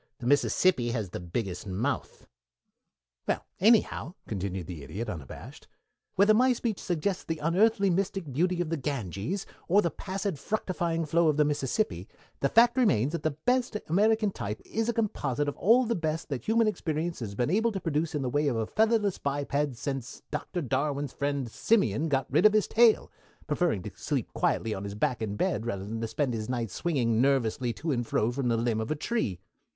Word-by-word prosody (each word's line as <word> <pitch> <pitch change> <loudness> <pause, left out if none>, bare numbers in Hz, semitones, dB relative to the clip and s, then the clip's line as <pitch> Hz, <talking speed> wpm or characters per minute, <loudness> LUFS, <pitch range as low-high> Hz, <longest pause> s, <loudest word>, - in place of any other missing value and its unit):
"The 120 - -9
Mississippi 145 0 +3
has 105 -6 -3
the - - -4
biggest 90 +2 -4
mouth." 115 +9 -3 1.0
"Well, - - -1
anyhow," 205 -4 +3
continued 95 -3 -3
the 85 -3 -7
Idiot, 105 +11 -5
unabashed, 75 -7 -8 0.5
"whether 205 +3 +5
my 255 +3 +4
speech 230 -4 -2
suggests 180 +2 -1
the 165 - -3
unearthly, 195 +6 +3
mystic 185 -5 -2
beauty 175 +5 +1
of 165 -2 -3
the 165 - 0
Ganges, 135 - -3 0.2
or 190 +4 +5
the 170 - 0
placid 195 -4 -4
fructifying 170 -5 -1
flow 165 +2 +3
of 150 -1 +2
the 150 - +4
Mississippi, 140 - -1 0.3
the 140 - +1
fact 235 +2 +5
remains 140 - +3
that 170 - -3
the 155 -2 -2
best 250 -3 +2
American 210 +4 +3
type 105 - -5
is 225 +1 -1
a - - +1
composite 145 - -1
of 145 - -2
all 235 +6 +5
the 235 - 0
best 160 -4 -2
that 135 -4 -4
human 225 +1 +3
experience 165 -5 -2
has 105 -4 -5
been 125 +7 0
able 225 +4 +2
to 195 - -3
produce 160 -2 -1
in 145 - -1
the - - -1
way 145 +4 +1
of 130 - +1
a 110 -1 0
featherless 215 - +1
biped 140 -1 -1
since 135 0 -5
Doctor 175 -3 -3
Darwin's 140 +1 -1
friend, 140 -2 -1
Simian, 165 - +1
got 135 -2 +1
rid 215 - +6
of 215 - +1
his 215 -1 +3
tail, 230 -1 +4 0.3
preferring 150 - 0
to - - -6
sleep - - -3
quietly 110 - 0
on 95 - -5
his 100 0 -5
back 115 +2 0
in 105 -2 -2
bed 105 +2 -1
rather 100 -4 -3
than 115 +2 -3
spend 130 +1 -1
his 110 0 -4
nights 120 -5 -2
swinging 120 -9 +1
nervously 130 -2 +1
to 160 +5 -3
and 120 -3 -1
fro 110 +3 +1
from 130 0 -2
the 115 -1 +2
limb 115 -1 0
of 110 - -4
a 155 - 0
tree. 150 - -2
150 Hz, 195 wpm, -28 LUFS, 120-195 Hz, 1.0 s, rid